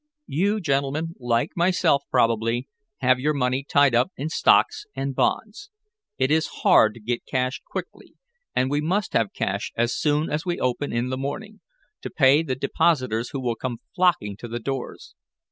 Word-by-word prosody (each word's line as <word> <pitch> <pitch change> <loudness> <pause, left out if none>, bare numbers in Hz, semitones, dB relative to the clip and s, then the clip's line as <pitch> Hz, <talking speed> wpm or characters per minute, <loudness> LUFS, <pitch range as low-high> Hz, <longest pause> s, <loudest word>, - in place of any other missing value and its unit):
You 200 +8 0
gentlemen, 145 +1 -1
like 120 -2 0
myself, 175 -4 +2
probably, 115 0 +1 0.3
have 130 0 +3
your 150 +3 0
money 130 0 0
tied 140 -2 +3
up 120 +2 +3
in 145 +4 -3
stocks 420 - +3
and 135 0 -2
bonds. 220 - -1 0.5
It 130 +2 +1
is 155 0 +2 0.2
hard 110 -1 +5
to - - -11
get 120 +2 -3
cash 130 0 -1
quickly, - - -7 0.4
and 130 +1 +1
we 145 +1 +1
must 185 +6 -1
have 115 -3 +1
cash 100 +2 -3
as 120 +1 +1
soon 150 +1 +1
as 150 +2 -1
we 175 -2 -2
open 130 +3 -1
in 120 +2 -1
the 130 0 -3
morning, 205 +11 -6 0.4
to - - -5
pay 145 -3 +4
the 140 -6 -2
depositors 130 -4 0
who 140 - -4
will 125 -2 -1
come 120 +1 -4 0.2
flocking 175 - +2
to 120 - -8
the 120 +1 -4
doors. 135 - -6
135 Hz, 175 wpm, -24 LUFS, 120-155 Hz, 0.5 s, hard